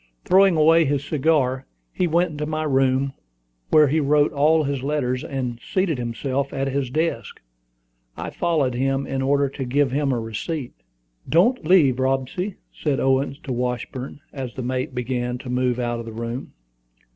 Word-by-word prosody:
Throwing 190 -2 +5
away 165 +2 +5
his 140 0 -1
cigar, 135 -4 +1 0.3
he 180 - +1
went 170 +1 +2
into 150 0 -4
my 155 0 -2
room, 135 -1 +1 0.6
where 155 -1 +6
he 155 +4 +2
wrote 145 0 +3
all 155 +2 +3
his 140 -2 -2
letters, 130 -3 -1
and 125 -4 -4
seated 185 -4 -1
himself 130 +4 -2
at 135 0 -2
his 135 -1 -1
desk. 160 +5 -2 0.8
I - - -5
followed 150 -7 0
him, 135 +2 0
in 135 0 -2
order 140 +1 +2
to 135 0 -5
give 135 +1 +1
him 140 0 +1
a 125 - 0
receipt. 120 +6 -4 0.6
"Don't 180 +3 +3
leave, 145 -9 +5
Robsy," 135 +9 -1 0.2
said 145 -4 -1
Owen 135 +1 +1
to 130 - -3
Washburn, 125 +3 -4
as 130 -4 -6
the 130 - -4
mate 130 +1 -3
began 125 0 -2
to 125 0 -7
move 125 -1 +1
out 120 -1 -2
of 115 - -7
the 115 - -7
room. 115 +3 -5
135 Hz, 170 wpm, -23 LUFS, 125-150 Hz, 0.8 s, where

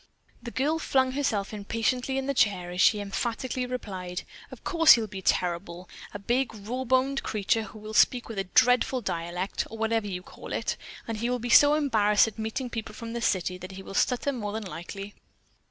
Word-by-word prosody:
The 235 - -6
girl 295 +7 0
flung 260 -4 +2
herself 225 -8 -1
impatiently 230 +5 -1
in 270 - -1
the 280 - 0
chair 195 -8 +1
as 180 +1 -1
she 210 +3 +5
emphatically 240 +5 -3
replied: 190 -7 -5 0.3
"Of - - -12
course 330 -3 +7
he'll 230 -2 +1
be 190 -2 -7
terrible! 175 0 -1 0.2
A - - -5
big, 240 +4 -1
rawboned 260 +5 0
creature 215 +1 0
who 215 0 -9
will 215 0 -8
speak 245 +3 +4
with 225 -4 -5
a 195 - -1
dreadful 250 +5 +3
dialect, 175 0 -3
or 225 - -8
whatever 225 -1 0
you 180 -2 -5
call - - -9
it; - - -1 0.3
and 225 -1 -3
he 235 +2 -1
will 250 - +1
be 245 0 -5
so 290 +4 +7
embarrassed 220 -8 +3
at 220 0 -8
meeting 220 +4 -3
people 225 -2 -6
from 230 0 -7
the 235 - -3
city, 185 -4 0
that 185 +1 -8
he 190 0 -8
will - - -9
stutter 250 +6 +1
more 210 -6 -4
than 220 -1 -4
likely." 195 +3 -7
225 Hz, 200 wpm, -27 LUFS, 195-250 Hz, 0.3 s, course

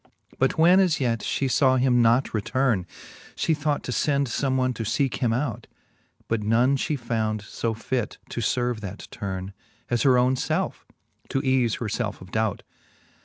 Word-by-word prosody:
But 135 - +2
when 175 +4 +6
as 180 -5 +3
yet 115 -4 0
(he 135 - -1
(aw 130 -2 +5
him 125 -1 +3
not 120 +3 +3
returne, 115 -3 0 0.5
She 165 - +1
thought 150 -1 -1
to - - -4
fend 140 +3 +1
fome 130 +2 0
one 130 -1 +1
to 115 - -4
leeke 125 +4 0
him 120 -3 +1
out; 125 -1 -2 0.6
But 115 -1 0
none 120 +6 +3
fhe 145 +2 -1
found 110 -4 -2
fo 110 +2 -3
fit 120 0 -3
to 120 - -4 0.2
lerve 120 -3 -1
that 100 -1 -7
turne. 95 -2 -5 0.4
As 120 -1 +2
her 130 -1 +5
own 125 +1 +3
lelfe, 130 - -2 0.4
to 135 - 0
eafe 130 -4 +2
her 115 - -3 0.2
(elfe 105 -2 -5
of 95 0 -13
dout. 110 -2 -1
125 Hz, 175 wpm, -25 LUFS, 110-135 Hz, 0.6 s, when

